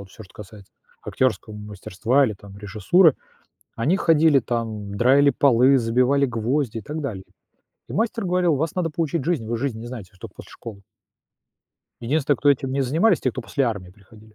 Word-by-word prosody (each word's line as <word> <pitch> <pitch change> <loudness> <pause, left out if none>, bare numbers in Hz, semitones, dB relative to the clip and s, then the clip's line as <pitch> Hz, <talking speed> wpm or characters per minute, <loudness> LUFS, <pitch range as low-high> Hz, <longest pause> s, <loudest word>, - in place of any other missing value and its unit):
вот 100 -1 -12
всё, 110 - -12
что 90 - -21
касается 105 -1 -13 0.3
актёрского 125 -4 -2
мастерства 105 +5 -1
или 110 - -2
там 100 0 -14
режиссуры. 110 - +3 0.6
Они 140 +11 +1
ходили 160 -5 +4
там, 110 -4 -4
драили 135 +5 +4
полы, 135 0 +4
забивали 125 +4 +2
гвозди 120 0 -2
и - - -10
так 150 +9 -6
далее. 100 -9 -5 0.7
И - - -7
мастер 225 0 -1
говорил: 180 -3 +1
"Вас 155 +3 -2
надо 180 -3 -1
поучить 160 -1 -2
жизнь, 160 -10 -1
вы 115 0 -2
жизни 115 -3 -3
не 120 - -8
знаете, 115 -7 -8
вы - - -23
ж - - -32
тока - - -10
после - - -12
школы". 105 -4 -10 1.2
Единственный, 140 +3 0
кто 145 - +3
этим 135 -1 -1
не 140 - -1
занимались- 165 - +2
те, 130 - 0
кто 130 - -6
после 135 +3 -1
армии 105 -7 -4
приходили. 105 +2 -19
125 Hz, 190 wpm, -22 LUFS, 110-145 Hz, 1.2 s, ходили